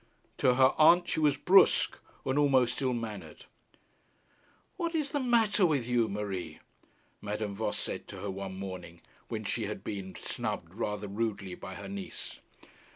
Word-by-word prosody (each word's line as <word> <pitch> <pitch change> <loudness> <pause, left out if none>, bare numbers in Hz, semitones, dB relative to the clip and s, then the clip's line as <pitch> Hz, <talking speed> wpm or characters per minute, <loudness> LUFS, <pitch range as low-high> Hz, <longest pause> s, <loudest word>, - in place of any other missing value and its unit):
To 125 -1 +4
her 130 +1 +5
aunt 175 +3 +7
she - - -1
was 150 -2 +3
brusque, 195 +2 +5 0.3
and 130 +2 +1
almost 130 -3 +3
ill 130 -1 +2
mannered. 105 -9 -6 1.3
'What 335 -1 -2
is 300 -3 0
the 290 - 0
matter 230 -6 +3
with 145 -9 +2
you, 120 -2 +2
Marie?' 100 -3 -4 0.6
Madame 105 0 -3
Voss 105 +1 -2
said - - -5
to - - -8
her 100 - -3
one 95 0 -6
morning, 90 -3 -7 0.3
when - - -4
she - - -1
had - - -6
been 95 -2 -5
snubbed 85 +1 -4
rather 105 -1 -3
rudely 100 -2 -2
by 95 +1 -8
her 100 - -7
niece. 100 0 -7
110 Hz, 155 wpm, -30 LUFS, 100-145 Hz, 1.3 s, aunt